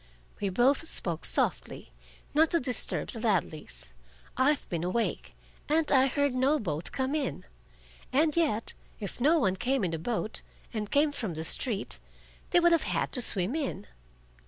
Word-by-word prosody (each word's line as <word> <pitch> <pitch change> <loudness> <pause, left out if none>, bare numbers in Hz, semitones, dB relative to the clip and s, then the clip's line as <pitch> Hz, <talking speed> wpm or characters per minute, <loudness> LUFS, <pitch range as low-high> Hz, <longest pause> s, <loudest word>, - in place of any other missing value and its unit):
We 200 - -1
both 265 - +2
spoke 170 - +1
softly, - - +2 0.4
not 315 +2 +4
to 335 - +2
disturb 250 -4 -1
the 230 - -7
Ladleys. 155 - -2 0.4
"I've 280 +3 +1
been 170 -1 -3
awake, 220 +6 -2 0.3
and 315 +1 +1
I 265 -1 +5
heard 285 0 0
no 265 +4 +2
boat 165 - -4
come 265 +1 -2
in. 280 - -3 0.7
And 305 +3 +2
yet, 290 -10 0 0.3
if 210 +3 -7
no 310 +6 +4
one 190 -10 +1
came 255 +2 0
in 170 -3 -1
a 165 - -3
boat, 215 +4 -3 0.3
and 210 -2 -3
came 290 +1 +3
from 220 - -4
the 160 - -4
street, 205 +4 -1 0.5
they 350 - +4
would 345 0 +4
have 335 - +2
had - - -1
to 250 - +4
swim 195 -1 +1
in." 275 -10 -3
245 Hz, 165 wpm, -29 LUFS, 190-290 Hz, 0.7 s, I